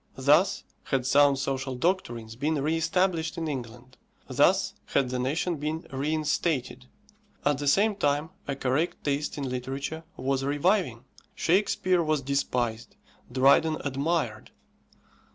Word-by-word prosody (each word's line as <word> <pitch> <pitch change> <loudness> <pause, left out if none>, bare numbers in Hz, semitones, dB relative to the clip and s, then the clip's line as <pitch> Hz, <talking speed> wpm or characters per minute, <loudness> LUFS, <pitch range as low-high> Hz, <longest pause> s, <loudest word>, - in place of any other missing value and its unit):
Thus 145 +8 +3 0.2
had 130 -3 0
sound 140 +1 +5
social 135 -1 -2
doctrines 120 -8 -1
been 150 +6 0
re 155 +4 0
established 165 0 0
in 165 -1 -2
England; 125 -2 -7 0.3
thus - - +3
had 130 - +1
the 125 - -1
nation 155 +6 -1
been 155 +3 -3
reinstated. 145 -2 -1 0.6
At 145 -2 +2
the 145 - -3
same 205 +8 +3
time 145 -1 0 0.2
a 140 - -2
correct 135 +6 -1
taste 145 +1 -1
in 140 -2 -3
literature 135 +5 -4
was 135 +1 -1
reviving. 145 - +1 0.3
Shakespeare 185 0 +2
was 155 -3 0
despised, 120 -4 -1 0.4
Dryden 140 +5 +4
admired. 145 +4 -1
145 Hz, 125 wpm, -27 LUFS, 130-160 Hz, 0.6 s, sound